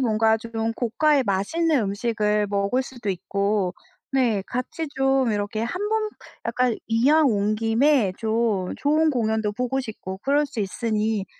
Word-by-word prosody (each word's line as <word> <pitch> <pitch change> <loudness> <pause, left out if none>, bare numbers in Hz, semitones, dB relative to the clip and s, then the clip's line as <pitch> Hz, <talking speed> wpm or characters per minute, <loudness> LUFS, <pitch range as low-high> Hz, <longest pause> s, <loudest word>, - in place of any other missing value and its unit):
뭔가 220 -2 +3
좀 225 0 -3
고가의 270 +4 +2
맛있는 275 - +1
음식을 210 0 0
먹을 200 +6 0
수도 240 -6 -5
있고 200 0 -1 0.4
네. 235 -7 +2
같이 255 +6 -4
좀 270 -3 +2
이렇게 205 +1 -2
1 360 - -2
번 435 0 0 0.4
약간 250 -2 +1
이왕 280 +8 +4
온 210 -2 +1
김에 225 -1 +3
좀 220 -4 0
좋은 310 +2 +2
공연도 220 -4 0
보고 250 +4 -1
싶고 210 -6 -7
그럴 290 +2 +2
수 235 -5 -5
있으니 215 0 -1
225 Hz, 260 characters per minute, -24 LUFS, 210-270 Hz, 0.4 s, 이왕